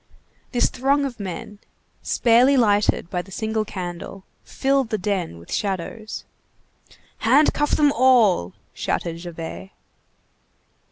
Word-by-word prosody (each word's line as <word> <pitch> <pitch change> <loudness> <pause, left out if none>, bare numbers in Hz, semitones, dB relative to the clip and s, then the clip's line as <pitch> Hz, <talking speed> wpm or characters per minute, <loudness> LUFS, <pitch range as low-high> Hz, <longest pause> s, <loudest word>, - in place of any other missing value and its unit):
This 245 - +3
throng 280 +3 +1
of 245 -4 -6
men, 200 +2 -6 0.4
sparely 245 +4 +4
lighted 205 -6 +2
by 180 - -1
the 185 - -16
single 220 +3 -2
candle, 185 -1 -7 0.2
filled 270 -3 0
the 215 - 0
den 185 - -2
with 85 - -10
shadows. 205 +3 -4 0.9
"Handcuff 290 +5 +3
them 295 -1 +4
all!" 230 - +3 0.2
shouted 165 -1 -2
Javert. 160 - -7
210 Hz, 110 wpm, -22 LUFS, 175-255 Hz, 0.9 s, sparely